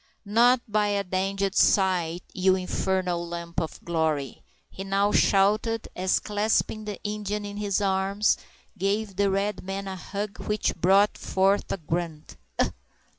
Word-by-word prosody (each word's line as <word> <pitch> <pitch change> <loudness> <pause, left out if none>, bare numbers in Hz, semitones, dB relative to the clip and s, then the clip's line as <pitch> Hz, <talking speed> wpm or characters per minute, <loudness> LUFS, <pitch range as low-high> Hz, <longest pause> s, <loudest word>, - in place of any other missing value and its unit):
"Not 240 +4 +4
by 210 -1 +1
a 200 -1 0
danged 195 +1 -1
sight, 180 -5 +2
you 185 0 +3
infernal 185 -1 -1
lump 170 0 -4
of 160 - -5
glory!" 160 -5 -1 0.3
he 195 - -8
now 195 +1 +1
shouted, 210 +4 +2
as, 185 +1 +1
clasping 215 +1 0
the 210 -2 -5
Indian 210 0 -3
in 205 0 -6
his 205 -1 0
arms, 195 +1 +2 0.4
he 205 - -27
gave 200 +1 -1
the 200 +1 +2
red 195 0 -1
man 195 +1 -4
a 190 - -4
hug 200 +3 -5
which 210 -1 -1
brought 195 +4 +3
forth 195 +1 +1
a - - -1
grunt. 165 -2 -4
195 Hz, 145 wpm, -26 LUFS, 185-205 Hz, 0.4 s, Not